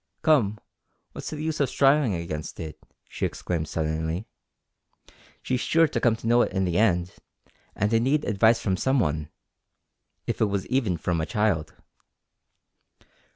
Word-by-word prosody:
"Come 115 -10 +3 0.5
what's - - -7
the 155 - -6
use 155 -1 -2
o' - - +4
strivin' 135 -2 +3
against 85 -3 -5
it?" 80 -2 -7 0.3
she - - -7
exclaimed 80 -3 -2
suddenly. 80 +4 -2 1.2
"She's 130 -1 -1
sure 165 0 +3
to - - -2
come 120 -2 +3
to 115 - -12
know 120 +1 +4
it - - 0
in 95 - 0
the 90 0 0
end, 90 -5 +2 0.6
and 105 +3 0
I 115 - +5
need 140 +6 +1
advice 110 +3 +3
from 95 -3 -1
some 130 +6 +1
one 75 -6 -1 1.0
if - - -3
it - - +5
was 100 -2 -2
even 115 -10 0
from 85 0 -1
a 80 - -3
child." 105 -9 0
105 Hz, 155 wpm, -26 LUFS, 85-130 Hz, 1.2 s, I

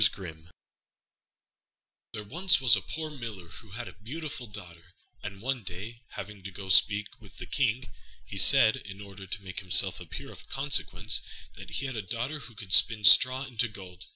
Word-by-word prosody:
RUMPELSTILTSKIN 85 -5 0 1.6
There 105 - -5
was 170 - +3
once 125 -4 +7
a - - -2
poor 155 -1 -5
Miller 110 - -8
who 110 +5 -12
had 120 +2 -6
a - - -9
beautiful 130 +2 -7
daughter, 90 -4 -11 0.3
and 100 0 -8
one 130 -1 -1
day, 105 +5 -8
having 100 0 -8
to 100 - -6
go 95 0 -7
to 95 - +8
speak 105 0 +4
with 105 -3 -17
the - - -7
King, 130 -2 0 0.4
he - - -9
said, - - +7
in 100 0 -9
order 100 -1 -10
to 100 +2 -5
make 95 -1 -5
himself 95 -2 +2
appear - - -8
of - - -13
consequence, 110 -8 0 0.3
that - - -11
he 140 - -3
had 130 -2 -4
a 110 - -2
daughter 120 +9 -4
who 120 -5 -12
could 100 -2 -5
spin 110 -2 +5
straw 130 +6 +7
into 120 -3 0
gold. 95 -4 -10
105 Hz, 185 wpm, -29 LUFS, 95-125 Hz, 1.6 s, to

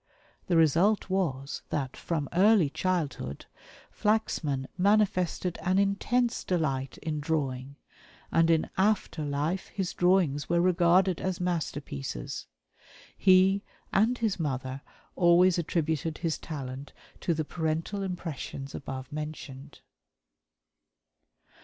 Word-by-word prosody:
The 175 - +3
result 170 +6 +3
was 145 -8 -1
that 135 -3 -2
from 155 -4 -2
early 190 -4 +5
childhood 155 - -2 0.5
Flaxman 155 -11 0
manifested 185 -3 +1
an 185 0 +1
intense 215 +5 +1
delight 140 -7 -1
in 155 -1 -2
drawing; 140 -3 -2 0.6
and 165 0 +4
in 165 -1 +2
after 195 -5 +1
life 150 +6 -1
his 190 -3 -3
drawings 175 -6 +2
were 170 0 +3
regarded 180 +1 +3
as 185 -2 -2
masterpieces. 145 - -4 0.7
He, 190 +1 +5 0.3
and 225 +5 +3
his 220 -6 -1
mother, 130 -3 -3 0.3
always 175 0 +5
attributed 160 -1 -1
his 165 -2 -2
talent 135 -3 -7 0.3
to 170 - 0
the 155 0 -2
parental 165 +5 -2
impressions 165 -7 -5
above 130 0 -6
mentioned. 150 -2 -7
165 Hz, 105 wpm, -28 LUFS, 145-185 Hz, 0.7 s, early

